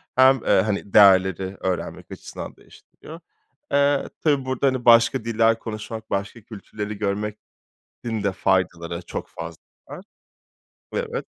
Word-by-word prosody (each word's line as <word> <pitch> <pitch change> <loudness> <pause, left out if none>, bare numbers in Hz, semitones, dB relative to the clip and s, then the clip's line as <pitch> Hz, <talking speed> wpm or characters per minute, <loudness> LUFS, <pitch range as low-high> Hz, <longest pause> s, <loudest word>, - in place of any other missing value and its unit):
hem, 130 0 +5
eee, - - +4
hani, 100 -2 -3
değerleri 95 -2 +5
öğrenmek 95 -1 -4
açısından - - -8
değiştiriyor. 160 +2 -15 0.5
Eee, 140 0 +2
tabii 145 -4 +1
burada, 130 +1 0
hani, 130 -2 -1
başka 115 +1 +5
diller 115 0 +2
konuşmak, 110 0 -7
başka 100 +4 -3
kültürleri 105 0 -7
görmenin 105 +1 -4 0.7
de 100 - +1
faydaları 90 -3 -1
çok 85 - -6
fazla - - -9 0.3
var. - - -9 0.9
Evet, - - -3
110 Hz, 120 wpm, -23 LUFS, 100-125 Hz, 0.9 s, hem